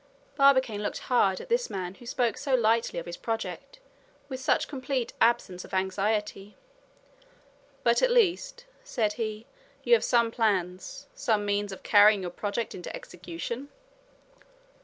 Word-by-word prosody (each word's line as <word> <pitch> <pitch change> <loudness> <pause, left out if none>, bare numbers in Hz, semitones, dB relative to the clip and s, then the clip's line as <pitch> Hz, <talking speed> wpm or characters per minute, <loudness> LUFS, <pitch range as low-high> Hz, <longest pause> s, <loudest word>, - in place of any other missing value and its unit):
Barbicane 260 -7 +4
looked 210 - -3 0.2
hard 190 -6 +3
at - - -9
this 480 +1 0
man 185 -2 -4
who 240 +4 -15
spoke 240 -2 0
so 275 -2 0
lightly 230 -3 +1
of 170 - -4
his 175 0 -7
project 225 - -5 0.5
with 260 -1 -5
such 260 - +1
complete 260 -3 -3
absence 190 -6 +2
of - - -7
anxiety. 200 +2 -1 1.3
"But, 235 0 +3
at - - +4
least," 485 +2 +1 0.2
said 225 - -1
he, 215 -1 -4 0.4
"you 485 - +3
have 470 - +5
some 235 -2 +2
plans, 205 - -1
some 220 - 0
means 205 0 -1
of 190 - -9
carrying 205 -1 +6
your 175 - -4
project 210 +5 -3
into 180 - -7
execution?" 180 +10 -7
225 Hz, 145 wpm, -28 LUFS, 200-260 Hz, 1.3 s, carrying